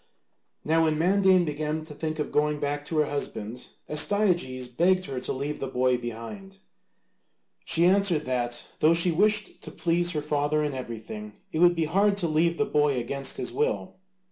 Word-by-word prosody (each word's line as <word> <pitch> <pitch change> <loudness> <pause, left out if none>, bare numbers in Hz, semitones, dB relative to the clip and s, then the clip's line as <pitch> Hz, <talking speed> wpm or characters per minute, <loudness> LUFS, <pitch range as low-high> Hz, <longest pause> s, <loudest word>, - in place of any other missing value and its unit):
Now 165 +1 +3
when 155 -1 +1
Mandane 185 +1 +3
began 155 +1 -3
to 155 - -10
think 155 +1 -4
of 150 - -3
going 150 0 +1
back 145 0 -3
to 160 +1 -3
her 150 - +3
husband, 125 -5 -5 0.2
Astyages 150 -6 +1
begged 185 +9 +1
her 135 -5 -4
to - - -4
leave 140 +3 -4
the 135 - -3
boy 125 0 +1
behind. 125 - -8 1.1
She 170 +1 +4
answered 185 -4 +3
that 120 -2 -2
though 160 +2 +4
she 170 +1 +4
wished 210 +6 +1
to - - -7
please 175 0 0
her 150 - -1
father 150 0 0
in 145 -1 -2
everything, 110 -4 -7 0.2
it 160 - -3
would 175 0 +5
be 165 -1 0
hard 200 +5 +2
to 175 - +1
leave 165 +2 +1
the 215 - +1
boy 150 -8 +1
against 135 +3 -3
his - - -4
will. 450 +3 -2
155 Hz, 180 wpm, -26 LUFS, 135-175 Hz, 1.1 s, would